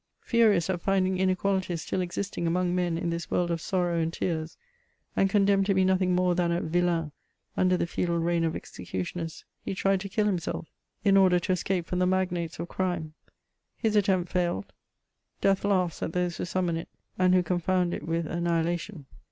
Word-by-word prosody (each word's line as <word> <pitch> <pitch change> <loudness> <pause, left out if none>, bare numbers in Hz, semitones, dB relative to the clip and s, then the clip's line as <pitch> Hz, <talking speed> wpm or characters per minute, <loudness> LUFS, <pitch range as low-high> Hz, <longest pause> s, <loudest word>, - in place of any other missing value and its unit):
Furious 215 -8 +3
at 180 -2 -2
finding 190 -1 +1
inequalities 185 -2 0
still 185 - -1
existing 180 0 -3
among 180 +1 +1
men 175 -2 0
in 170 0 -2
this 170 0 -4
world 175 -1 +1
of 165 -1 -2
sorrow 175 -3 0
and 165 0 0
tears, 160 -2 -3 0.6
and 195 - +3
condemned 195 -1 +3
to 195 - +2
be 190 0 +4
nothing 185 -1 +2
more 180 0 +2
than 175 -1 +1
a 170 - +1
vilain 170 -2 0 0.4
under 185 0 +3
the - - 0
feudal 170 0 -1
reign 170 0 +1
of 165 -1 0
execu 90 +1 -5
tioners, 165 - -6 0.2
he - - -3
tried 195 0 +2
to 195 +1 -6
kill 210 +2 +1
himself, 180 -5 -2 0.4
in 195 -2 +5
order 185 -2 +5
to 175 +2 -1
escape 185 -1 0
from 180 - -2
the 180 - +3
magnates 180 -3 -1
of 170 - -4
crime 175 -4 -2 0.3
\ - - -54
his 220 -1 +2
attempt 190 -4 +2
failed: 175 - -1 0.7
death 195 -1 +2
laughs 185 -5 +1
at 165 - -3
those 180 -1 -1
who - - -2
summon 175 -1 -1
it, 165 - -7 0.3
and 185 0 +5
who 180 - +4
confound 180 0 0
it - - -4
with 165 +1 -1
annihilation. 170 0 -1
180 Hz, 195 wpm, -28 LUFS, 170-190 Hz, 0.7 s, in